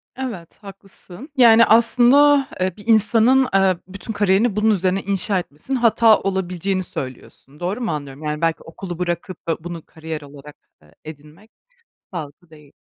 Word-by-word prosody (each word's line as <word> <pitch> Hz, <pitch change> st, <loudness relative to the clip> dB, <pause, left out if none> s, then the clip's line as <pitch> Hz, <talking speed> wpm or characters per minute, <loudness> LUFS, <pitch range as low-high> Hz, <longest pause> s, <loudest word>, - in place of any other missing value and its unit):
Evet, 225 Hz, -11 st, -7 dB
haklısın. 195 Hz, -, -13 dB
Yani, 230 Hz, -2 st, +7 dB
aslında, 255 Hz, +5 st, +4 dB
eee, 185 Hz, -1 st, 0 dB
bir 210 Hz, +2 st, -15 dB
insanın, 230 Hz, +4 st, +4 dB
eee, 190 Hz, -2 st, +3 dB
bütün 195 Hz, +4 st, -8 dB
kariyerini 205 Hz, +2 st, +1 dB
bunun 215 Hz, +1 st, +2 dB
üzerine 190 Hz, 0 st, 0 dB
inşa 195 Hz, 0 st, 0 dB
etmesinin 175 Hz, -, -5 dB
hata 230 Hz, -2 st, +4 dB
olabileceğini 190 Hz, 0 st, -2 dB
söylüyorsun, 135 Hz, 0 st, -9 dB
doğru 190 Hz, +7 st, -3 dB
mu 230 Hz, -, -2 dB
anlıyorum? 145 Hz, -1 st, -7 dB
Yani, 150 Hz, +1 st, -4 dB
belki 165 Hz, -1 st, -1 dB
okulu 175 Hz, +1 st, -9 dB
bırakıp 175 Hz, 0 st, -5 dB
da 160 Hz, -1 st, -3 dB
bunu 170 Hz, -2 st, -8 dB
kariyer 160 Hz, -1 st, -8 dB
olarak, 145 Hz, +1 st, -13 dB, 0.3 s
eee, 75 Hz, +1 st, -24 dB
edinmek 155 Hz, +7 st, -13 dB, 0.6 s
sağlıklı 160 Hz, 0 st, -8 dB
değil. 150 Hz, -3 st, -18 dB
185 Hz, 150 wpm, -20 LUFS, 160-220 Hz, 0.6 s, Yani